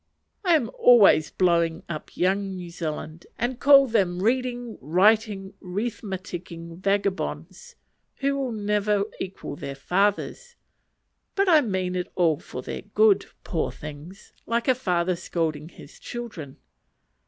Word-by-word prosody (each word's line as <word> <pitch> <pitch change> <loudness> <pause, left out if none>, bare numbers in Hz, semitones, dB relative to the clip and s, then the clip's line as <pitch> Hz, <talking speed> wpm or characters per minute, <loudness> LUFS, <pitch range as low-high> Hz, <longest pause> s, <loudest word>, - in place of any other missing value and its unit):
I 350 -3 +4
am 245 -8 0
always 210 -10 +6
blowing 170 -2 +1
up 155 -3 -7
"Young 195 +1 0
New 175 -2 -7
Zealand," 155 0 -6
and 240 +1 -2
calling 275 -2 +6
them 185 -5 +1
"reading, 245 0 -1
riting, 195 - +2
rethmatiking" 180 -4 -5
vagabonds, 200 - -2 0.4
who 275 0 0
will 270 -3 -2
never 210 -1 +1 0.2
equal 185 -6 -6
their 140 -1 -6
fathers; 205 - -1 0.8
but 395 0 +2
I 320 -4 +6
mean 185 -6 -2
it 180 -1 -3
all 165 -5 +2
for 125 - -8
their - - -5
good 205 0 +3 0.2
(poor 165 - -2
things!) 150 +6 -11
like 230 +1 0
a 260 - +6
father 180 -7 0
scolding 160 -3 -3
his - - -15
children. 210 - -7
195 Hz, 130 wpm, -25 LUFS, 170-235 Hz, 0.8 s, always